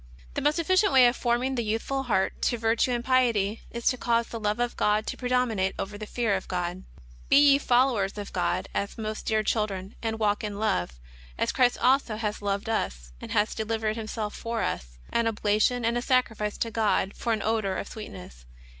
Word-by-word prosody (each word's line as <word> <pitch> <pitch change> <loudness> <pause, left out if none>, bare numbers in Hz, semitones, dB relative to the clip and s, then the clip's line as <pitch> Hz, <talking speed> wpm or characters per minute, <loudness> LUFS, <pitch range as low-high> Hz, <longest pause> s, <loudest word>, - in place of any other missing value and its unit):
The - - -2
most 295 +3 +2
efficient 370 +4 +3
way 260 -2 +7
of 240 +1 +4
forming 245 +2 0
the 240 -2 -1
youthful 225 +5 -1
heart 200 -7 0
to 240 - +1
vir 225 0 +1
tue 235 - +2
and 240 -1 -2
piety 230 -5 +2
is 235 0 -7
to 255 - -1
cause 235 -1 +1
the 230 - -7
love 210 +1 -1
of 240 0 -1
God 210 +1 +1
to - - -3
predominate 245 -6 0
over 205 +1 -4
the 215 +1 -7
fear 230 -3 0
of 190 - -4
God: 180 0 -3 0.2
" - - -22
Be - - +5
ye 285 -1 +7
followers 240 -7 +2
of 205 -1 -6
God, - - 0
as 200 - -3
most 215 -1 -5
dear 215 -1 +2
children; 200 -3 -1
and 225 -1 -2
walk 210 -1 +1
in 205 -1 -4
love, 200 - 0 0.4
as - - 0
Christ 250 -1 +3
also 255 -3 +2
hath 210 -1 -3
loved 200 +1 -2
us, 60 - -2
and - - -8
hath 210 +1 +1
delivered 220 0 -1
Himself 215 -1 -4
for 230 0 -3
us, - - -4 0.2
an 235 -1 +2
ob 225 -2 -2
lation 215 +3 +2
and 230 +1 +1
a 240 - 0
sacrifice 225 -5 0
to 230 - -2
God 210 -3 +1
for 235 - -2
an 215 -2 0
odour 215 -3 0
of - - -4
sweetness." 90 - -10
220 Hz, 215 wpm, -27 LUFS, 205-240 Hz, 0.4 s, way